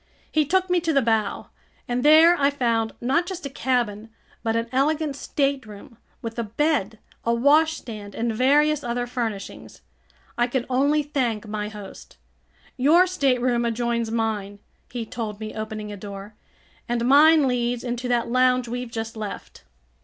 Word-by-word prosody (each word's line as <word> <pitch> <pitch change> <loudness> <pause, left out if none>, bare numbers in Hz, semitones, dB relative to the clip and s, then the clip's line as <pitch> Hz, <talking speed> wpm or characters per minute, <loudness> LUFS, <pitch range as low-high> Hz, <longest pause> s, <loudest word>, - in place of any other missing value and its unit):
He 310 -1 +2
took 375 +4 +2
me 360 -1 +2
to 330 -1 -1
the 275 - +4
bow, 220 -2 0 0.4
and 245 +1 -1
there 320 +3 +7
I 280 -4 +3
found 230 -5 0
not 275 +8 +1
just 365 -5 -6
a 275 - -5
cabin 235 -5 -1 0.3
but 225 0 -1
an 230 0 0
elegant 295 +2 0
stateroom 265 -6 -3 0.3
with 230 0 -5
a - - 0
bed, 225 -2 0 0.3
a 235 - +1
washstand, 255 -6 +1
and 230 0 -1
various 290 +5 +3
other 245 0 -2
furnishings. 235 -5 -5 0.6
I 240 - +3
could 245 0 -2
only 285 +4 +2
thank 245 -7 -2
my 210 0 -4
host. 205 -2 -11 0.6
"Your 315 +8 +5
stateroom 255 -8 +1
adjoins 235 0 -1
mine," 220 -3 -2 0.3
he 240 -2 -4
told 215 -2 -5
me, 215 -1 -6
opening 215 -1 -5
a 205 - -7
door, 200 +1 -9 0.6
"and 235 0 0
mine 295 +2 +6
leads 245 -1 -1
into 245 0 -3
that 240 -1 +1
lounge 255 0 +2
we've 245 +1 -4
just 225 -1 -5
left." 215 -2 -8
245 Hz, 155 wpm, -24 LUFS, 225-280 Hz, 0.6 s, there